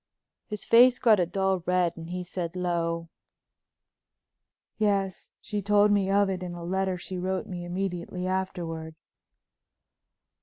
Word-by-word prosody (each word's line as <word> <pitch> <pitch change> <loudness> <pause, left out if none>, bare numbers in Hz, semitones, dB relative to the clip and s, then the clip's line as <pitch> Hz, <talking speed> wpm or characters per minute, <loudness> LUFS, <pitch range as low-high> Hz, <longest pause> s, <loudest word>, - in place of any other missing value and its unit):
His 210 -3 -5
face 245 +2 +7
got 220 -5 +5
a 175 - +2
dull 190 0 0
red 180 -2 +2
and 165 0 -9
he 180 0 -3
said 175 -1 -5
low. 170 -2 -1 1.7
"Yes, 200 -3 0
she 210 -2 -3
told 205 +1 +4
me 200 -2 +2
of 200 0 +4
it 190 -1 -3
in 175 -1 -5
a 170 - -7
letter 190 +1 -1
she 180 +1 -6
wrote 185 +1 -2
me 175 -2 -6
immediately 180 0 -3
afterward." 175 -4 -3
185 Hz, 140 wpm, -27 LUFS, 175-195 Hz, 1.7 s, face